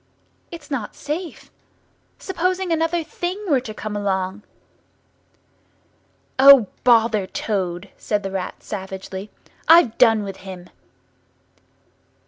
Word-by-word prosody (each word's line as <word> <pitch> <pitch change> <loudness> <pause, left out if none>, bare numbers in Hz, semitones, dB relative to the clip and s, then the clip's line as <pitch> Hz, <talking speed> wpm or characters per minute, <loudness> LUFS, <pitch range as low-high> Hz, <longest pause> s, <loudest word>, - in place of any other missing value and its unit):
It's 315 -4 -11
not 240 -7 -4
safe. 320 +4 -6 0.7
Supposing 370 0 -2
another 330 +1 +1
Thing 350 +4 -4
were 285 -6 +3
to 230 - -7
come 215 0 -6
along?" 195 -1 -2 2.0
"O, 270 -6 +8
bother 225 -5 +3
Toad," 185 -3 -3
said 210 -2 -2
the 195 - -4
Rat 190 -1 -5
savagely; 190 0 -7 0.4
"I've 325 -9 +6
done 225 -3 +5
with 195 -1 -7
him!" 185 -2 -10
220 Hz, 105 wpm, -21 LUFS, 195-315 Hz, 2.0 s, O